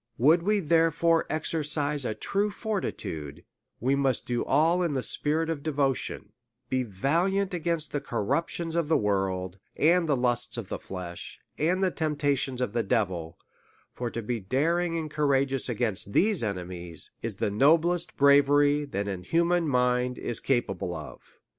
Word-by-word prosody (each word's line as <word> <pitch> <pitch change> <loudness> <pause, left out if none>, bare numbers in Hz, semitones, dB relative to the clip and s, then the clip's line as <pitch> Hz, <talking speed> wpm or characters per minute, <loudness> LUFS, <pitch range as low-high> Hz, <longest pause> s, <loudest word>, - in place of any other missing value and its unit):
Would 155 +8 +5
we 210 +4 +2
therefore 165 0 +2
exercise 150 -3 0
a 110 - -2
true 205 +1 -1
fortitude, 185 - -4 0.4
we 130 +4 +1
must 135 -3 +1
do 120 -1 -1
all 165 +6 +3
in 170 -4 0
the 130 -2 -1
spirit 155 +2 0
of 160 -3 -3
devotion, 135 -8 -2 0.4
be 130 0 +1
valiant 170 - 0
against 170 -2 -2
the 145 - -2
corruptions 165 +9 -2
of 170 -3 +1
the 160 - +3
world, 95 -2 -1 0.2
and 170 +1 +3
the 145 - +4
lusts 120 -1 0
of 105 -5 -6
the - - -4
flesh, 90 -2 -7 0.2
and 180 +5 +1
the 185 - +2
temptations 145 -5 -1
of 125 -4 -1
the 120 - +1
devil; 90 -5 -1 0.6
for 120 -1 -3
to 115 0 -5
be 115 +2 -2
daring 165 - 0
and 155 -2 -4
courageous 140 -3 +1
against 110 -4 -2
these 205 -2 +4
enemies, 90 -5 -5
is - - -3
the - - -1
noblest 165 - +2
bra 140 0 +7
very 145 +1 +2
that 100 -7 -3
a 95 -2 -2
human 170 - +1
mind 125 -1 +1
is 115 - -2
capable 95 -8 -1
of. - - -8
140 Hz, 160 wpm, -27 LUFS, 115-165 Hz, 0.6 s, bra